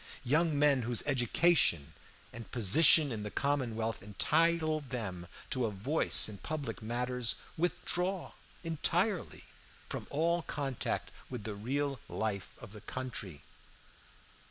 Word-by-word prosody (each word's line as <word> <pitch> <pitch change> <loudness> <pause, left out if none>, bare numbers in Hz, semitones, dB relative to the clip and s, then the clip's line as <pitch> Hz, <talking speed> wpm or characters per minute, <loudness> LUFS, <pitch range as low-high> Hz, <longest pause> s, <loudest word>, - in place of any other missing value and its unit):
Young 150 +4 +2
men 140 -2 +4
whose 120 0 +1
education 125 - +2 0.4
and 115 0 -8
position 140 - +6
in 110 -3 -4
the 105 - -5
commonwealth 115 -5 -1
entitle 155 +9 +2
them 110 - -5 0.2
to 125 -3 +1
a - - -2
voice 110 +11 +3
in 105 -2 -7
public 155 -5 -5
matters 120 +2 -2 0.2
withdraw 180 +2 -2 0.3
entirely 170 +4 -1 0.5
from - - -5
all 170 +4 +1
contact 140 -5 -3 0.2
with 125 -5 -6
the 110 - -4
real 135 +6 -2
life 105 -3 -3
of 115 - -11
the 105 -1 -11
country. 115 - -5
130 Hz, 120 wpm, -32 LUFS, 110-155 Hz, 0.5 s, position